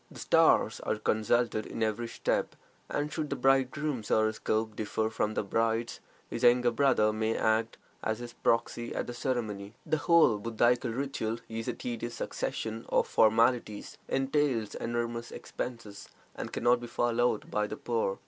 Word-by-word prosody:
The -, -, -13 dB
stars -, -, +4 dB
are -, -, -1 dB
consulted 110 Hz, +1 st, +1 dB
in 115 Hz, -, -3 dB
every 110 Hz, +2 st, -1 dB
step, -, -, -1 dB, 0.3 s
and 145 Hz, +1 st, -2 dB
should 155 Hz, -2 st, -2 dB
the -, -, -1 dB
bridegroom's 135 Hz, -1 st, +1 dB
horoscope 110 Hz, 0 st, +1 dB
differ 110 Hz, +1 st, -1 dB
from 110 Hz, -1 st, -1 dB
the -, -, 0 dB
bride's, 115 Hz, +3 st, 0 dB, 0.3 s
his 115 Hz, -, -5 dB
younger 120 Hz, 0 st, +5 dB
brother 115 Hz, -4 st, +3 dB
may 110 Hz, +1 st, 0 dB
act 110 Hz, +1 st, +1 dB, 0.2 s
as 110 Hz, 0 st, -1 dB
his 120 Hz, 0 st, -8 dB
proxy 115 Hz, 0 st, 0 dB
at -, -, -1 dB
the 120 Hz, -, -6 dB
ceremony. 115 Hz, -5 st, -3 dB
The 155 Hz, -, +1 dB
whole 150 Hz, -9 st, +4 dB
Buddhaical 120 Hz, +3 st, +1 dB
ritual 115 Hz, -2 st, -2 dB
is 115 Hz, 0 st, -5 dB
a -, -, 0 dB
tedious 120 Hz, -1 st, -5 dB
succession 110 Hz, 0 st, -4 dB
of -, -, +3 dB
formalities, 110 Hz, -1 st, +2 dB
entails 135 Hz, -5 st, 0 dB
enormous 120 Hz, 0 st, -3 dB
expenses, 115 Hz, -5 st, -7 dB, 0.2 s
and -, -, -6 dB
can -, -, -4 dB
not 120 Hz, 0 st, +5 dB
be 120 Hz, -, -7 dB
followed 120 Hz, -1 st, 0 dB
by 105 Hz, 0 st, 0 dB
the 110 Hz, -, -6 dB
poor. 115 Hz, -5 st, -1 dB
115 Hz, 160 wpm, -30 LUFS, 110-125 Hz, 0.3 s, younger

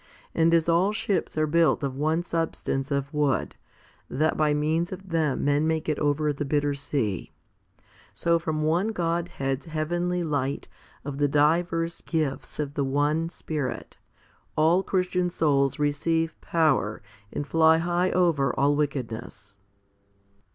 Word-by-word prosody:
And 165 Hz, 0 st, +3 dB
as 165 Hz, -1 st, +3 dB
all 175 Hz, +4 st, +3 dB
ships 195 Hz, -6 st, -1 dB
are 155 Hz, -, +3 dB
built 165 Hz, 0 st, +2 dB
of 135 Hz, -2 st, -2 dB
one 155 Hz, +4 st, 0 dB
substance 165 Hz, -5 st, -2 dB
of 140 Hz, 0 st, -2 dB
wood, 145 Hz, -3 st, 0 dB, 0.6 s
that 155 Hz, +5 st, +1 dB
by 155 Hz, -1 st, +2 dB
means 155 Hz, +4 st, 0 dB
of 190 Hz, 0 st, -8 dB
them 160 Hz, -6 st, 0 dB
men 145 Hz, +2 st, +2 dB
may 160 Hz, 0 st, +1 dB
get 155 Hz, -1 st, -2 dB
over 150 Hz, 0 st, +1 dB
the 145 Hz, -, -3 dB
bitter 145 Hz, 0 st, 0 dB
sea, 135 Hz, -, -2 dB, 0.8 s
so 170 Hz, 0 st, +1 dB
from 155 Hz, -2 st, -2 dB
one 170 Hz, +6 st, +2 dB
Godhead's 165 Hz, -8 st, -2 dB
heavenly 175 Hz, +3 st, -1 dB
light 140 Hz, -3 st, -2 dB, 0.4 s
of 140 Hz, -1 st, -5 dB
the 145 Hz, -, +3 dB
divers 165 Hz, +3 st, +1 dB
gifts 155 Hz, -5 st, -2 dB
of 145 Hz, -2 st, -3 dB
the 145 Hz, -, 0 dB
one 145 Hz, +4 st, +1 dB
Spirit, 150 Hz, -7 st, -5 dB, 0.6 s
all 165 Hz, +4 st, +4 dB
Christian 180 Hz, -2 st, 0 dB
souls 140 Hz, -5 st, +1 dB
receive 160 Hz, +2 st, 0 dB
power 150 Hz, -10 st, +1 dB, 0.3 s
and 145 Hz, -, -3 dB
fly 160 Hz, +1 st, +4 dB
high 175 Hz, +2 st, +1 dB
over 165 Hz, -7 st, +2 dB
all 145 Hz, +1 st, +3 dB
wickedness. 115 Hz, -8 st, -4 dB
155 Hz, 140 wpm, -26 LUFS, 145-165 Hz, 0.8 s, all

